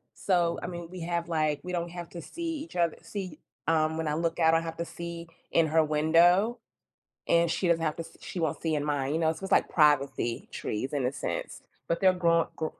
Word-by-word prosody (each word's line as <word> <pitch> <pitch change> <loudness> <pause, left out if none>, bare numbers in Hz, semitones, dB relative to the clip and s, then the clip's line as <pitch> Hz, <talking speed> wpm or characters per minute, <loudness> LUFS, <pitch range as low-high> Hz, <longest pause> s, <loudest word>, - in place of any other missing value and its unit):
so, 175 -3 +1
I - - -3
mean, 175 -1 -6
we 180 -1 -8
have, 170 0 -2
like 155 -3 0
we 180 - -5
don't 170 -1 -2
have 175 -1 -7
to 170 - -7
see 330 - -4
each - - -16
othe 170 -2 +2
see 185 -6 -6 0.3
um, 160 0 +2
when 160 -1 -2
I 150 - 0
look 165 +1 -1
out, 160 0 +5
I - - +6
don't 165 - -2
have 165 0 -6
to 170 - -2
see 170 0 -7 0.2
in 165 -1 +4
her 160 +1 +4
window, 170 +9 +4 0.7
and 170 0 +4
she 180 - 0
doesn't 165 -1 +2
have 155 - -1
to 165 - -4
s - - -17
she 180 - -7
won't 160 -3 -1
see 160 -2 0
in 145 -1 -1
mine, 145 -2 -1
you 165 - 0
know? 160 0 +3
So, 180 +4 -9
it's - - -4
like - - +4
privacy 140 -6 +2
trees 130 +7 -3
in 140 -3 0
a 130 - 0
sense, 140 - -4 0.3
but 170 - +1
they're 190 -1 +6
gro 170 -2 +2
g 160 - 0
165 Hz, 245 wpm, -28 LUFS, 155-175 Hz, 0.7 s, I